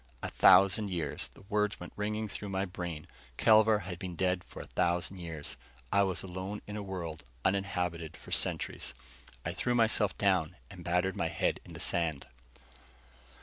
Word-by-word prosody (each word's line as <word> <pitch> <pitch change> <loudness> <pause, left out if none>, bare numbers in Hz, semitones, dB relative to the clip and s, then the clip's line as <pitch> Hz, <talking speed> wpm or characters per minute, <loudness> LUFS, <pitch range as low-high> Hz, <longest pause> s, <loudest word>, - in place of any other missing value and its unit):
A - - -1
thousand 100 +2 +6
years! 85 -4 -2
The - - -18
words 105 -1 +1
went 90 - -9
ringing 105 +1 -1
through 105 0 -5
my 95 0 0
brain. 85 -4 -5 0.3
Kelvar 110 -1 +6
had 90 -1 -6
been 90 -1 -5
dead 90 +1 +1
for - - -11
a - - -12
thousand 90 +2 0
years. 80 -4 -6 0.3
I 100 - +5
was 95 -2 +1
alone 95 +2 -5
in 105 - -6
a 105 - -3
world 90 -5 -5 0.2
uninhabited 90 -4 0
for - - -13
centuries. - - -1 0.5
I 85 - -1
threw 120 +6 0
myself 110 -4 +3
down 90 -4 +2 0.2
and 90 -3 -10
battered 90 +2 +1
my 85 - 0
head 85 - 0
in - - -12
the - - -8
sand. 80 -5 0
95 Hz, 170 wpm, -32 LUFS, 85-100 Hz, 0.5 s, thousand